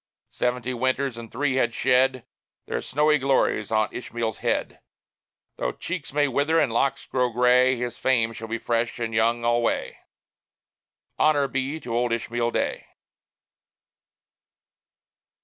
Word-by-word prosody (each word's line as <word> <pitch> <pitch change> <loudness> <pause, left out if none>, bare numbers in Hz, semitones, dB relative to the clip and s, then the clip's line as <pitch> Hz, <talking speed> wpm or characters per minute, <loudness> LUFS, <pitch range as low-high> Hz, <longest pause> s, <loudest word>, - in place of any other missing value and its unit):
Seventy 125 0 -1
winters 130 +1 0
and 115 -1 -9
three 135 -2 0
had 120 -2 +1
shed 130 -1 +2 0.4
Their - - -3
snowy 150 +2 +2
glories 130 -6 +1
on 110 -1 +1
Ishmael's 115 -3 -4
head. - - -1 0.8
Though - - -2
cheeks 170 -4 -5
may 145 +1 +2
wither 145 +5 +2
and 125 -7 +1
locks 135 +3 0
grow 125 -1 0
gray, 125 +2 +4
His 120 0 -4
fame 115 -3 +2
shall 115 0 -7
be 115 +1 -2
fresh 115 0 -1
and 115 -1 -3
young 115 +1 +1
alway 120 0 0 1.2
Honor 145 -2 +3
be 135 +4 -2
to 115 -1 -4
old 120 0 +1
Ishmael 120 +1 -1
Day! - - -2
125 Hz, 130 wpm, -25 LUFS, 115-135 Hz, 1.2 s, gray